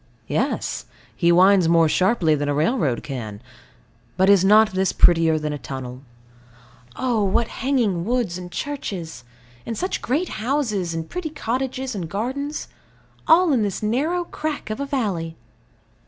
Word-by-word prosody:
Yes; - - -2 0.3
he 170 -1 +3
winds 185 0 +5
more 165 -1 +5
sharply 185 -1 +2
than 145 -1 -1
a 145 - 0
railroad 155 - 0
can. 115 -7 -6 0.8
But 190 +2 +5
is 195 -2 +5
not 215 +2 +6
this 190 0 +1
prettier 165 -2 +4
than 150 -1 -3
a 145 - -5
tunnel? 130 -1 -7 0.9
Oh, 240 -5 0
what 200 +4 +1
hanging 235 -10 0
woods, 235 -4 -1
and 180 -1 -8
churches; 180 - -5 0.4
and 230 - -5
such 370 - -2
great 305 +9 -1
houses, 215 - -1
and 165 0 -4
pretty 360 -3 -4
cottages 260 -1 -3
and 180 -6 -5
gardens 265 - -3 0.6
all 330 0 +5
in 245 - +2
this 205 0 -2
narrow 300 +11 0
crack 305 -8 -5
of 215 - -4
a 280 - -3
valley! 195 - -2
200 Hz, 150 wpm, -22 LUFS, 165-260 Hz, 0.9 s, not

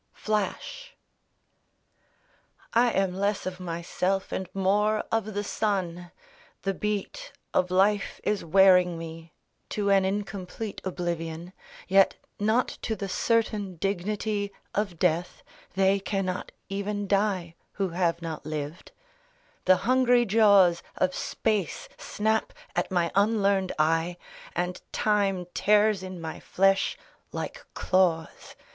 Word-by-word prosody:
FLASH 355 - -3 1.8
I 240 +1 +5
am 195 -4 +1
less 200 +2 -1
of 185 0 -4
myself 180 +2 -2
and 190 -1 -3
more 205 +3 +2
of 215 -2 -1
the 205 - -1
sun; 185 -5 -2 0.5
The 195 - 0
beat 210 - -3 0.2
of 185 - +2
life 195 +3 +2
is 210 -1 0
wearing 180 0 +5
me 165 0 -8 0.4
To 200 -1 0
an 195 -1 +5
incomplete 195 +1 -4
oblivion. 175 -1 -4 0.3
Yet 195 0 +5 0.2
not 220 +4 +2
to 220 - -2
the 200 -1 -4
certain 210 -2 0
dignity 200 +3 -2 0.2
Of 195 -4 -1
death. 175 +1 0 0.3
(They 195 +1 +3
cannot 195 -2 -2 0.2
even 200 +1 -3
die 195 -4 +1 0.2
Who 195 -2 -1
have 170 -1 0
not 160 -2 -5
lived.) 155 +2 -5 0.7
The 185 0 +6
hungry 245 -1 +4
jaws 200 -5 +5 0.2
Of 185 0 +1
space 210 -6 -1
snap 220 +1 -1 0.2
at - - 0
my 175 -3 +1
unlearned 200 -2 +2
eye. 165 +3 +1 0.4
And 180 +1 -2
time 200 -4 +1
tears 210 -1 +3
in 185 -1 -7
my 160 -1 -6
flesh 195 +1 +2 0.3
like - - -5
claws. 180 -4 0
195 Hz, 115 wpm, -27 LUFS, 180-210 Hz, 1.8 s, The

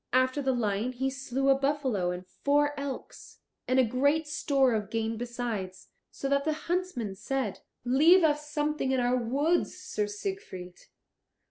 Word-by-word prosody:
After 255 +2 +3
the 265 -1 +1
lion 225 0 -1
he 265 +2 -1
slew 270 0 -1
a - - +8
buffalo 270 -9 0
and 180 +1 -4
four 290 +9 +1
elks, 280 -2 -7 0.3
and 255 - +2
a 260 - +6
great 285 +7 +1
store 275 -4 +2
of 210 -3 -2
game 225 0 -1
besides, 225 -6 -4 0.2
so 275 - -5
that 280 0 +2
the 310 +1 +1
huntsmen 345 - -1
said, 215 +2 -3 0.3
"Leave 315 +9 +6
us 300 -1 +1
something 295 -2 0
in 260 - +2
our 245 0 +2
woods, 275 +8 +1
Sir 420 -1 -2
Siegfried." 385 - -6
265 Hz, 155 wpm, -29 LUFS, 230-295 Hz, 0.3 s, a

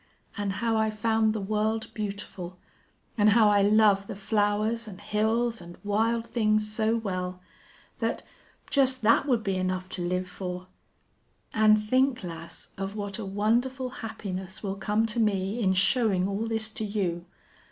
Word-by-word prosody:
An' 205 -1 -2
how 225 +3 0
I 220 0 +2
found 220 0 +1
the 215 - -2
world 215 +2 -1
beautiful, 200 -4 -5 0.6
an' 205 - +5
how 215 0 +6
I 205 -1 +4
love 205 -1 +4
the - - -5
flowers 210 +3 0
an' 195 -4 -8
hills 220 +3 0
an' 175 0 -11
wild 225 +3 +1
things 215 -2 +1
so 220 +1 +2
well 185 -4 -3 0.6
that, - - -1 0.5
just 260 -3 +2
that 230 +6 +4
would 240 -5 +2
be 195 -2 0
enough 185 0 -2
to 185 - -4
live 180 +1 -1
for!... 180 0 -6 0.9
An' 215 -1 +5
think, 255 +3 +1
lass, 170 -1 -8
of 195 +1 -4
what 200 -1 -4
a 215 - -4
wonderful 240 +6 0
happiness 190 -4 -5
will 195 -2 -2
come 210 +3 +1
to 225 +1 -2
me 200 0 +1
in 190 -3 +3
showin' 195 -2 +3
all 200 +3 -2
this 220 -1 0
to 220 - -4
you. 185 -5 -2
210 Hz, 160 wpm, -27 LUFS, 195-225 Hz, 0.9 s, how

